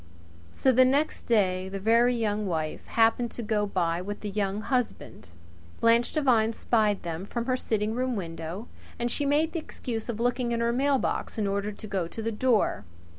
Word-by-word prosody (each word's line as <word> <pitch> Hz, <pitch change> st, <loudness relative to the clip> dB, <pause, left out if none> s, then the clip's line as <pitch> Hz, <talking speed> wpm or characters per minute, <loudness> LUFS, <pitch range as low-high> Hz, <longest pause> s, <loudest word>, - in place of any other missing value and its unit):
So 265 Hz, -, +2 dB
the 255 Hz, +1 st, +6 dB
next 280 Hz, +4 st, +1 dB
day 190 Hz, -5 st, +2 dB
the 195 Hz, +1 st, -4 dB
Very 230 Hz, +4 st, +4 dB
Young 210 Hz, -2 st, -1 dB
Wife 160 Hz, -3 st, -3 dB
happened 230 Hz, +1 st, +2 dB
to 240 Hz, -, -5 dB
go 210 Hz, -1 st, 0 dB
by 170 Hz, -3 st, 0 dB
with 205 Hz, +2 st, -6 dB
the 210 Hz, -, -4 dB
Young 200 Hz, 0 st, -1 dB
Husband. 250 Hz, -, -3 dB, 0.5 s
Blanche 230 Hz, +1 st, +4 dB
Devine 235 Hz, -7 st, +3 dB
spied 215 Hz, -3 st, +1 dB
them 170 Hz, 0 st, -4 dB
from 235 Hz, +4 st, -4 dB
her 255 Hz, 0 st, +1 dB
sitting 220 Hz, -3 st, -1 dB
room 255 Hz, +1 st, -1 dB
window, 170 Hz, +3 st, -5 dB, 0.3 s
and 240 Hz, 0 st, -1 dB
she 285 Hz, +3 st, -1 dB
made 305 Hz, +3 st, +2 dB
the 335 Hz, -, -2 dB
excuse 235 Hz, -7 st, -6 dB
of 225 Hz, -2 st, -3 dB
looking 245 Hz, 0 st, 0 dB
in 230 Hz, -, 0 dB
her 235 Hz, 0 st, +1 dB
mailbox 270 Hz, -1 st, 0 dB
in 215 Hz, -, 0 dB
order 200 Hz, +1 st, -1 dB
to 210 Hz, -, -10 dB
go 195 Hz, -5 st, -2 dB
to 225 Hz, -, -7 dB
the 225 Hz, -, -1 dB
door. 230 Hz, 0 st, +1 dB
225 Hz, 190 wpm, -27 LUFS, 200-245 Hz, 0.5 s, the